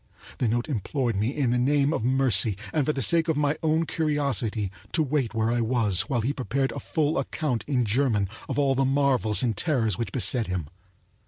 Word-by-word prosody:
The 125 - +1
note 120 +2 -1
implored 125 -2 -2
me 105 +3 0
in 135 -3 -1
the 125 - +1
name 140 +3 +2
of - - -2
mercy, 120 -6 +2 0.2
and 145 -4 0
for - - +3
the 135 -3 -2
sake 165 +7 +2
of 160 -3 0
my 145 0 +1
own 160 0 +1
curiosity, 140 - -1 0.2
to 160 - +3
wait 135 -5 -1
where 110 0 +1
I 120 0 0
was 110 -5 +1
while 120 -4 0
he 130 +6 -1
prepared 135 0 -2
a - - -6
full 155 +1 -1
account 130 -9 -2
in 130 -4 +1
German 110 -3 +1 0.2
of - - -3
all 140 -2 +2
the 135 +1 +1
marvels 135 -5 +2
and 115 -4 0
terrors 115 - 0
which 115 -6 -3
beset 120 -4 +2
him. 90 -5 -4
130 Hz, 210 wpm, -25 LUFS, 110-145 Hz, 0.2 s, for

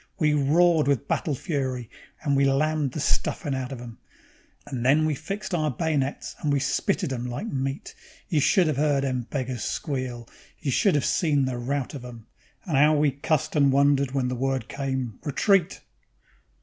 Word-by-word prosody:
We 155 -5 +2
roared 155 +2 +3
with 140 0 +1
battle 150 - 0
fury, 130 - -3 0.4
and 140 -1 +1
we 140 - +3
lammed 145 0 +1
the - - -4
stuffin' 145 0 -1
out 130 -1 -3
of 135 - -6
'em, 120 -2 -10 0.7
And 125 -3 -4
then 145 +5 +4
we 155 - +1
fixed 195 +7 -5
our 155 -3 +1
bay'nets 140 +1 -2
and 150 - -1
we 140 - +2
spitted 135 0 0
'em 125 -1 -3
like 125 - -4
meat. 135 -6 -3 0.3
You 155 - +1
should 175 +4 +4
'ave 145 -2 0
'eard 145 -2 +2
the 135 -1 0 0.2
beggars 130 -5 -3
squeal; 130 -5 -3 0.3
you 140 - -2
should 190 - +3
'ave 145 - 0
seen 145 -5 +2
the 125 -2 -3
rout 135 +3 -2
of 135 -4 -7
'em, 120 -3 -10 0.4
And 155 -7 0
'ow 150 +2 +5
we 145 -1 +3
cussed 140 +3 -1
and 140 -2 +4
wondered 140 0 +3
when 130 -1 -1
the 125 - -2
word 130 -2 -1
came: 130 -6 -3
Retreat! 175 +4 +2
140 Hz, 185 wpm, -25 LUFS, 130-150 Hz, 0.7 s, ow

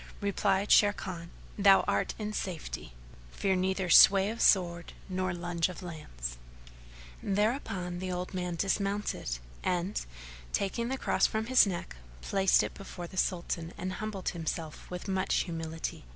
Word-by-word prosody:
Replied 200 0 +1
Sharrkan, 185 -4 +3 0.3
"Thou 195 -1 +7
art - - -1
in 215 -1 -4
safety: 170 - -5 0.4
fear 190 - 0
neither 190 0 0
sway 195 +1 +8
of 230 - -5
sword 175 -3 +3
nor 185 -1 -1
lunge 175 -1 -1
of 180 +1 -8
lance." - - -6 0.8
Thereupon 200 -4 -1
the 185 0 -3
old 180 +1 -4
man 180 -1 -2
dismounted 195 - -1 0.3
and, 180 +2 -1 0.5
taking 215 +4 -1
the 265 +2 -2
Cross - - +2
from 220 0 -2
his 255 -2 +6
neck, 175 - -5 0.2
placed 195 - +3
it - - -4
before 195 -3 -8
the 175 - -11
Sultan 170 -2 -1
and 185 +1 -3
humbled 210 -2 -3
himself 165 -1 -5
with 180 +2 -6
much 190 0 +1
humility. 165 -1 -5
185 Hz, 140 wpm, -30 LUFS, 175-200 Hz, 0.8 s, sway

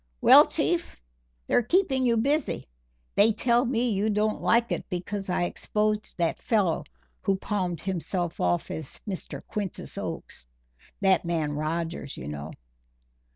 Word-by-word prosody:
"Well, - - +8
Chief, - - 0 0.5
they're - - +3
keeping 265 - +2
you 230 -1 +3
busy. 280 - 0 0.5
They 215 +3 +5
tell 240 +3 +2
me 240 -1 +1
you 205 +2 +1
don't 210 +1 0
like 235 +1 +3
it - - -1
because 195 +2 -4
I 180 - +1
exposed 210 +4 -1
that 170 -2 0
fellow 190 -9 +1 0.4
who 195 - +1
palmed 185 -3 -2
himself 180 -2 -2
off 85 -1 0
as 155 -3 -4
Mr. 190 -3 -5
Quintus 205 -4 -4
Oakes - - -6 0.5
that 190 -2 +4
man 165 -3 -1
Rogers, 160 0 -3
you 65 - -7
know." 75 +1 -6
195 Hz, 140 wpm, -27 LUFS, 170-225 Hz, 0.5 s, Well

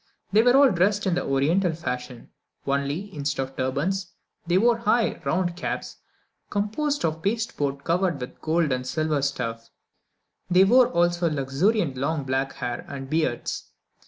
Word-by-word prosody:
They 210 +2 +6
were 245 +2 +4
all 275 -2 +6
dressed 200 +4 +1
in 190 - +1
the 180 - 0
Oriental 160 +7 +1
fashion, 125 -6 -6 0.3
only, 140 +8 -2
instead 140 -2 -2
of 135 0 -10
turbans, 170 +9 -1 0.4
they 175 +1 +3
wore 230 +3 +3
high, 235 -1 +1
round 180 -2 0
caps, 175 - -4 0.5
composed 250 - -1
of 160 0 -2
pasteboard 160 -10 -2
covered 175 -2 +1
with 125 - -8
gold 160 -1 +1
or 125 0 -2
silver 150 +3 -1
stuff. 115 -5 -3 0.8
They 180 +1 +6
wore 245 +5 +6
also 175 -5 +1
luxuriant 150 - 0
long 145 +3 -1
black 135 +1 -1
hair, 120 -2 -4
and 135 -1 -7
beards. 155 -6 -1
160 Hz, 150 wpm, -25 LUFS, 135-195 Hz, 0.8 s, They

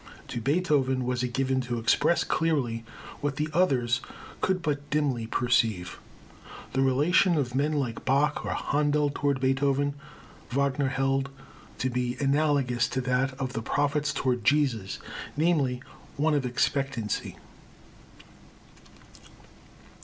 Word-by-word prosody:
To 120 - -4
Beethoven 135 -3 +1
was 125 -1 -1
it 125 -1 -2
given 130 +1 0
to 120 -1 -3
express 115 +9 +2
clearly 135 -8 0 0.4
what 145 -1 -2
the 150 +2 -2
others 135 -8 +2 0.4
could 185 -2 0
but 145 -2 -2
dimly 140 -6 0
perceive. 115 -7 0 0.7
The 135 - +1
relation 155 +7 +3
of 130 -4 -1
men 145 +4 +1
like 130 -6 -2
Bach 140 +3 +1
or - - -2
Händel 145 0 +1
toward 140 -3 0
Beethoven, 135 +2 +1 0.6
Wagner 140 +1 +1
held 135 0 0 0.5
to 130 - -1
be 125 0 -1
analogous 140 -4 +2
to 130 - -2
that 130 +1 0
of 130 -2 -3
the 115 - -2
prophets 145 +4 0
toward 130 -5 -1
Jesus, 130 -7 +1 0.4
namely, 145 -6 +1 0.3
one 155 +2 +2
of 140 -3 +1
expectancy. 125 -3 -1
135 Hz, 125 wpm, -27 LUFS, 125-145 Hz, 0.7 s, relation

